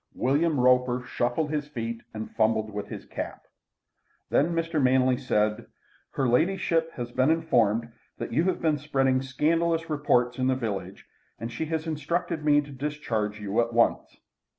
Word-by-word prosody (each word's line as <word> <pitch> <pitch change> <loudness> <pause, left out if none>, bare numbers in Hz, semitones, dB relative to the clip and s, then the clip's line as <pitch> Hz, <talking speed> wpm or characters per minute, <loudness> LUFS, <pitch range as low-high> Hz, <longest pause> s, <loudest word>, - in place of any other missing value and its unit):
William 145 +3 +1
Roper 125 0 +3
shuffled 130 +6 -1
his 150 -2 -2
feet 115 -4 -5
and 110 0 -7
fumbled 110 -1 +1
with 105 0 -4
his - - -8
cap. - - -6 0.9
Then 165 +4 +2
Mr. 165 -2 0
Manley 130 0 +4
said: 110 -3 0 0.5
"Her 135 - 0
ladyship 165 +4 +1
has 120 -1 -5
been 130 +3 +2
informed 120 -9 +2 0.3
that - - -5
you 160 +7 +2
have 185 -2 0
been 155 -2 +2
spreading 135 -3 +1
scandalous 165 +5 0
reports 125 -4 +1
in 130 - +1
the 130 - +2
village, 110 -6 -5 0.3
and 115 +1 -6
she 120 +7 -3
has 160 0 -2
instructed 160 +1 -2
me 145 -1 +4
to 145 0 -11
discharge 130 -7 -3
you 105 +2 0
at 115 0 -2
once." 115 0 +1
130 Hz, 160 wpm, -27 LUFS, 120-155 Hz, 0.9 s, Manley